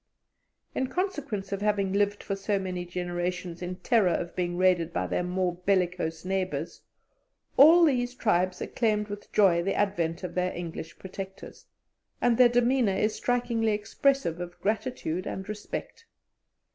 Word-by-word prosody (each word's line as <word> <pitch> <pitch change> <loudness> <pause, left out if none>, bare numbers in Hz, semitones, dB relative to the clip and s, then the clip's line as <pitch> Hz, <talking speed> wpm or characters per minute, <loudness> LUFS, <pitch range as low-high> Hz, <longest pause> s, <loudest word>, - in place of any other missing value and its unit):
In 260 - -1
consequence 285 - -3
of 200 0 -2
having 205 -2 +1
lived 205 0 +1
for 195 - -2
so 200 +1 -1
many 185 -2 -3
generations 175 0 -3
in 180 0 -4
terror 200 +1 +2
of 170 0 -2
being 175 -1 -1
raided 180 -2 +3
by - - -1
their - - -1
more 180 0 -1
bellicose 180 -3 -1
neighbours, 190 0 -2 0.7
all 330 +5 +8
these 250 -4 +1
tribes 185 -6 +1
acclaimed 210 -3 0
with 205 0 -8
joy 185 -5 +4
the 195 +3 -1
advent 175 -4 0
of 180 - -4
their 180 0 0
English 170 -1 -6
protectors, 190 0 -9 0.5
and 240 -1 +2
their 250 -1 +8
demeanour 245 -3 +2
is 215 +2 +1
strikingly 240 -3 0
expressive 210 -4 0
of 175 0 -7
gratitude 205 -5 -2
and 190 0 -5
respect. 215 - -6
195 Hz, 145 wpm, -28 LUFS, 180-225 Hz, 0.7 s, all